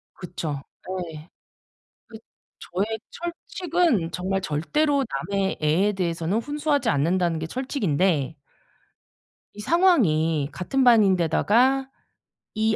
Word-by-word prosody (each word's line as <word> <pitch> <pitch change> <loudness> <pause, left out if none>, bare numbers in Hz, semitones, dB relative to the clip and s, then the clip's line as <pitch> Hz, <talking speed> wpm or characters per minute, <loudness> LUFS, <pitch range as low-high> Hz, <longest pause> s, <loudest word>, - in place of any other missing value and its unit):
그쵸. 165 -6 -5 0.5
네. 155 +1 -11 0.8
그 225 - -11 0.4
저의 205 +5 -3
철칙은 340 - -1
정말 190 +2 -2
절대로 275 - 0 0.3
남의 195 -1 0
애에 175 +7 +2
대해서는 175 +1 -1
훈수하지 290 +3 -1
않는다는 170 +3 +1
게 160 - -4
철칙인데 185 - 0 1.2
이 210 - -13
상황이 185 - +2
같은 265 +9 -1
반인데다가 230 - +3 0.6
이 220 0 +1
195 Hz, 220 characters per minute, -24 LUFS, 165-265 Hz, 1.2 s, 반인데다가